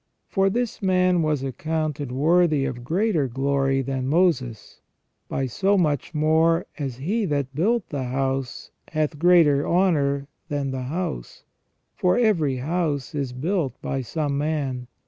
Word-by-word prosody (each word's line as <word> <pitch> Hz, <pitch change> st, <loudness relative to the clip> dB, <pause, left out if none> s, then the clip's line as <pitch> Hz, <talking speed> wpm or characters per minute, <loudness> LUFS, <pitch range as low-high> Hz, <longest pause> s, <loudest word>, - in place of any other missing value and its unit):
For 195 Hz, 0 st, +2 dB
this 240 Hz, +3 st, -2 dB
man 185 Hz, -2 st, +3 dB
was 150 Hz, -4 st, 0 dB
accounted 150 Hz, 0 st, -3 dB
worthy 155 Hz, +1 st, +3 dB
of 125 Hz, -2 st, -4 dB
greater 170 Hz, -, +1 dB
glory 135 Hz, +1 st, 0 dB
than 130 Hz, 0 st, -3 dB
Moses, 140 Hz, -, 0 dB, 0.5 s
by 135 Hz, -, -1 dB
so 195 Hz, -, +1 dB
much 155 Hz, -2 st, 0 dB
more 160 Hz, +2 st, +3 dB
as 135 Hz, -4 st, -3 dB
He 200 Hz, -, -1 dB
that 140 Hz, -4 st, -2 dB
built 220 Hz, -, 0 dB
the 140 Hz, -3 st, -3 dB
house 130 Hz, 0 st, -3 dB, 0.2 s
hath 155 Hz, -1 st, -2 dB
greater 165 Hz, -5 st, +5 dB
honour 145 Hz, -6 st, +2 dB, 0.2 s
than 140 Hz, -2 st, -2 dB
the 130 Hz, -1 st, -4 dB
house, 160 Hz, -, -4 dB, 0.5 s
for 180 Hz, 0 st, +1 dB
every 175 Hz, -, +2 dB
house 145 Hz, +1 st, -2 dB
is 140 Hz, -4 st, -2 dB
built 145 Hz, -, -2 dB
by 135 Hz, -, -2 dB
some 140 Hz, +2 st, -2 dB
man. 140 Hz, -5 st, -2 dB
150 Hz, 140 wpm, -24 LUFS, 135-175 Hz, 0.5 s, greater